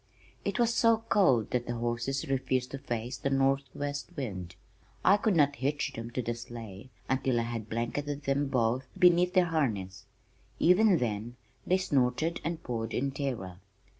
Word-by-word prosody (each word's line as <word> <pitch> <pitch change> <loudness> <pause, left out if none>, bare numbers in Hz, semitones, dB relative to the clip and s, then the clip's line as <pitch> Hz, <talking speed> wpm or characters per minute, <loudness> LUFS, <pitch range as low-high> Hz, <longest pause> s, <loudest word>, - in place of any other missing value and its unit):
It - - -2
was 235 -1 +3
so 230 -1 +3
cold 130 - +3
that 120 -1 -1
the 120 - -2
horses 120 +3 -2
refused 130 -1 0
to 140 - -5
face 120 0 -4
the 140 - -1
northwest 135 +1 0
wind. 95 -10 -5 0.5
I 195 - +7
could 210 -1 +1
not 145 -2 +3
hitch 140 +4 -1
them 115 0 -6
to 125 +1 -3
the 120 - -1
sleigh 115 -2 -9 0.2
until 130 -2 +1
I - - 0
had 115 -2 -5
blanketed 140 +5 -3
them 140 +1 +1
both 125 0 0
beneath 180 0 +5
their 185 -1 +5
harness; 110 - -2 0.5
even 185 +2 +5
then 115 -2 -3 0.3
they 185 - +4
snorted 150 -1 0
and 165 +1 -3
pawed 115 -2 -3
in 135 +2 0
terror. 120 -11 -4
130 Hz, 165 wpm, -30 LUFS, 120-145 Hz, 0.5 s, I